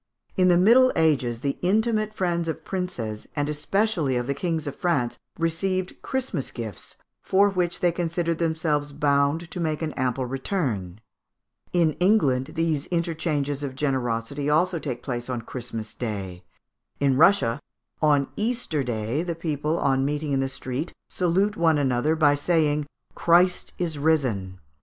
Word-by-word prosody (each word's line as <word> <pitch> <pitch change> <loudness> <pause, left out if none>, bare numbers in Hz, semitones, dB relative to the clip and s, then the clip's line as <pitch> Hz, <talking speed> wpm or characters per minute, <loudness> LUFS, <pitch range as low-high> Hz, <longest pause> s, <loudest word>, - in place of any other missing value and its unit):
In 185 -1 +4
the 175 -1 +5
Middle 240 +8 +6
Ages 135 -8 +2
the 140 -1 -2
intimate 215 +3 +1
friends 175 -5 -1
of 160 0 -4
princes, 120 - -4
and 145 -1 0
especially 155 - 0
of 120 0 0
the 140 - -1
kings 165 -1 -2
of 145 - -4
France, 145 -10 0 0.2
received 185 +3 -1
Christmas 265 - -2
gifts, 110 -6 -7 0.2
for 200 +2 +3
which 180 -1 -1
they 175 -2 +4
considered 170 -1 -1
themselves 160 -3 0
bound 145 +3 +1
to 180 - -5
make 160 -1 -1
an 155 - -2
ample 130 0 -1
return. 125 - -3 0.7
In 170 -3 +3
England 150 -10 +2
these 160 -3 0
interchanges 160 -5 -1
of 135 -2 -4
generosity 135 0 -1
also 170 +3 +2
take 130 -6 -5
place 120 -2 -4
on 125 -2 -2
Christmas 115 -3 -6
Day. 95 -6 -5 0.6
In 140 -2 +3
Russia, 155 -5 +4 0.4
on 145 -3 +3
Easter 220 - -1
Day, 115 +3 -2
the 170 -1 -3
people, 155 -1 -1
on 135 -3 +2
meeting 145 +1 -1
in 135 - +2
the 135 0 0
street, 135 +4 -5
salute 190 +4 +1
one 165 -2 +3
another 135 +2 +1
by 150 -3 +4
saying 150 -1 +1 0.3
"Christ 175 +2 +3
is 165 -4 -2
risen." 125 -12 0
150 Hz, 150 wpm, -25 LUFS, 135-175 Hz, 0.7 s, Middle